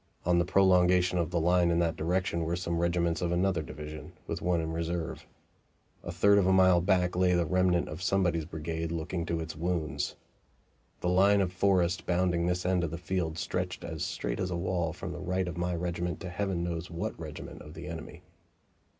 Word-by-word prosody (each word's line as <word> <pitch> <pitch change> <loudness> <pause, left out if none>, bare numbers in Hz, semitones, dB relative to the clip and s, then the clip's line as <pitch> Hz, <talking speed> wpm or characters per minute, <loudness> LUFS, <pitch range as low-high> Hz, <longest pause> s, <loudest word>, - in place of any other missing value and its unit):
On 90 0 +3
the 85 - +2
prolongation 90 -1 +4
of 85 -2 0
the 85 -1 0
line 90 +1 +3
in 85 - +2
that 85 -1 +1
direction 85 +1 0
were 85 +2 -1
some 85 -1 -2
regiments 85 -1 +1
of 85 -1 0
another 90 -1 +1
division, 75 0 -8
with - - -4
one 90 -1 +1
in 80 0 -2
reserve. 85 0 -3 0.8
A - - -5
third 100 +4 +5
of 95 - +2
a - - +4
mile 95 -2 +5
back 90 -1 +2
lay 90 0 +3
the 85 -1 +2
remnant 90 +1 +2
of 75 +3 -7
somebody's 90 -4 +1
brigade 80 +1 -4
looking 85 +1 -3
to 85 - -1
its 80 -1 -5
wounds. 80 -4 -2 0.9
The 90 - 0
line 100 +3 +5
of 90 -2 0
forest 90 -3 +1
bounding 85 -1 +1
this 90 0 -1
end 90 -1 +2
of 85 - -1
the 85 - -5
field 85 -2 -2
stretched 90 +2 -3
as 80 -2 -4
straight - - -3
as 95 - -1
a 90 - -2
wall 85 -1 -1
from - - -6
the - - -6
right 95 0 -1
of 90 - -4
my 90 0 -1
regiment 85 -1 -2
to 90 - -5
Heaven 95 -2 -1
knows 85 0 -3
what 85 0 -3
regiment - - -8
of 75 +2 -11
the - - -8
enemy. 85 -2 -8
85 Hz, 205 wpm, -30 LUFS, 85-90 Hz, 0.9 s, third